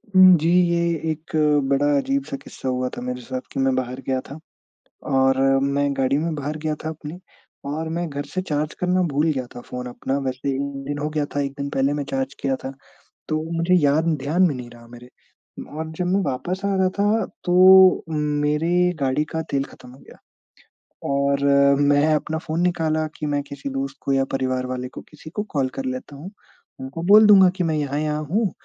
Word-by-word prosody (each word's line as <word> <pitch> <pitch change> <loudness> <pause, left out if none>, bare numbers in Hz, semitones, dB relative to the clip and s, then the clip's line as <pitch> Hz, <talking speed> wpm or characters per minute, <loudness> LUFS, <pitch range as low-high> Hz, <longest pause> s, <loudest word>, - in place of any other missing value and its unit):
उम, 185 -1 +9
जी 160 +2 0 0.2
ये 170 0 +1 0.3
एक 155 +1 -8 0.4
बड़ा 140 +1 +2
अजीब-सा 275 - -2
किस्सा 135 - -7
हुआ 125 0 -1
था - - -5
मेरे 125 0 -4
साथ 130 +1 -5
कि - - -4
मैं 135 0 +2
बाहर 130 0 -3
गया 130 -1 +1
था, 140 - -8 0.7
और 135 0 +2 0.3
मैं 140 +1 +1
गाड़ी 135 +1 +2
में 160 +2 -1
बाहर 150 +1 -4
गया 155 0 -2
था 155 - -2
अपनी, 160 +2 -8 0.5
और 155 +3 -3
मैं 170 +1 -2
घर 145 0 -5
से 185 - -1
चार्ज 150 -4 -2
करना 180 +1 +1
भूल 150 +3 +2
गया 130 -4 -3
था 120 - -7
फ़ोन 125 0 -7
अपना, 125 +2 -3
वैसे 130 0 -3
1 135 - -2 0.3
दिन 145 0 -3
हो 150 +1 -2
गया 150 -1 -1
था - - +1
1 140 -1 -2
दिन 140 0 -3
पहले 135 +1 +1
मैं 145 -1 -2
चार्ज 135 0 -2
किया 135 -1 0
था, 135 - -5 0.5
तो 155 0 -1 0.2
मुझे 170 +2 +1
याद 145 +3 +3 0.2
ध्यान 165 +6 +2
में 145 - -2
नहीं 125 -1 -8
रहा 120 0 -15
मेरे। 120 +1 -13 0.7
और 160 0 -4
जब 180 - -1
मैं 190 +2 +2
वापस 175 +6 -3
आ 200 - +1
रहा 190 -1 +2
था, 210 +2 +2 0.2
तो 175 - 0 0.5
उम, 160 - -4 0.3
मेरे 170 +4 +2
गाड़ी 135 +2 +1
का 160 - -1
तेल 135 -1 +1
खत्म 130 - -14
हो 130 - -16
गया, - - -16 0.9
और 140 0 0 0.4
मैं 145 0 +4
अपना 155 +1 -2
फ़ोन 160 0 -4
निकाला 160 -3 0
कि 155 - -4
मैं 145 -1 0
किसी 140 0 -7
दोस्त 135 0 -4
को 140 - -1
या 135 0 +2
परिवार 130 -1 -1
वाले 125 0 -4
को - - -9
किसी 155 +1 -12
को 210 +5 -3
कॉल 135 -2 +1
कर 135 - -4
लेता 130 +2 -5
हूँ, 160 +8 -9 0.5
उनको 135 +5 -6
बोल 210 +2 +8
दूँगा 195 -3 +8
कि 180 - -1
मैं 160 -2 0
यहाँ-यहाँ 150 +1 -1
हूँ, 200 +5 0
145 Hz, 205 wpm, -22 LUFS, 135-160 Hz, 0.9 s, उम